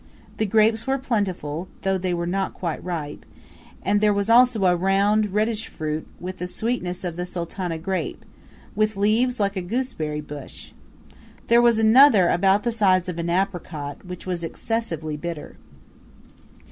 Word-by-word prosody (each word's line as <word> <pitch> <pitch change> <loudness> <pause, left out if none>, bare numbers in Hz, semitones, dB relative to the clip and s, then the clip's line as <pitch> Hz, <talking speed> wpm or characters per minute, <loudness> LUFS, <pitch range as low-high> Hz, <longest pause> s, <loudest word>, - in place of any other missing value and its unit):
The 215 - 0
grapes 220 +3 +3
were 270 0 +2
plentiful, 185 - -2 0.2
though 195 -1 +1
they 180 0 -1
were 170 0 -2
not 190 +2 -2
quite 170 -4 -4
ripe; 165 -5 -5 0.6
and 205 +1 +2
there 210 -1 +3
was 200 +2 0
also 240 -4 +5
a 180 -1 +4
round, 200 +3 +2
reddish 215 +2 0
fruit 155 0 -4
with 185 +1 -6
the 180 - -3
sweetness 185 -3 -2
of 175 -2 -4
the 180 - -2
Sultana 175 -1 -4
grape, 185 +3 -4 0.5
with 215 -1 0
leaves 225 +5 +2
like 200 -1 0
a 190 - -2
gooseberry 175 - -3
bush. 145 -2 -10 0.8
There 235 +1 +6
was 235 -2 +4
another 225 -3 +6
about 195 +3 +3
the 240 - 0
size 190 -5 +2
of 170 -1 -5
an 170 0 -2
apricot, 170 -6 -3
which 180 -1 -8
was 180 -2 -3
excessively 165 -5 -3
bitter. 165 -1 -6
190 Hz, 160 wpm, -23 LUFS, 170-220 Hz, 0.8 s, There